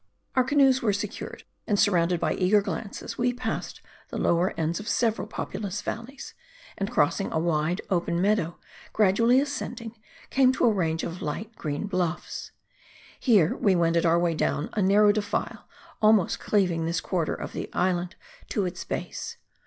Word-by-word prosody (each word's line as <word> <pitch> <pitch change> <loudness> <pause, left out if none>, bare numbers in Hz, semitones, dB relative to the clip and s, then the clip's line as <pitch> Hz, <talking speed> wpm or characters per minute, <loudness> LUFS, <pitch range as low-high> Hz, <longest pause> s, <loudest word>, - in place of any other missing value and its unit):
Our 255 - +5
canoes 265 -1 +4
were 215 -3 +2
secured. 200 - -5 0.2
And 205 - +2
surrounded 180 -3 +3
by - - +1
eager 195 +3 +3
glances, 200 +1 -5
we 245 0 +2
passed 245 - -4 0.3
the - - -5
lower 170 +2 +2
ends 165 +3 -1
of 210 - -8
several 225 0 0
populous 205 +1 -4
val 230 +2 -4
leys; 275 +2 -10 0.4
and 195 +1 -2
crossing 220 -4 +1
a - - 0
wide, 165 +2 0
open 170 -1 +1
meadow, 190 -3 +1 0.4
gradually 230 +5 +4
ascend 280 -2 -3
ing, 230 -1 -8 0.4
came 260 -1 +5
to - - +1
a 230 - +4
range 165 -4 0
of 170 +2 -5
light 205 +9 -4
green 150 +2 -3
bluffs. 180 -4 -3 0.7
Here, 205 - +4
we 195 -3 +2
wended 170 -1 +2
our 170 -1 +4
way 170 -1 +2
down 150 -1 -1
a 215 - 0
narrow 205 +2 +5
defile, 205 -1 -3 0.3
almost 215 -4 +4
cleaving 180 -6 +1
this 165 0 0
quarter 170 -2 -1
of - - -7
the - - -5
island 180 0 0 0.3
to 205 - 0
its 180 - -4
base. - - -5
195 Hz, 170 wpm, -26 LUFS, 170-220 Hz, 0.7 s, Our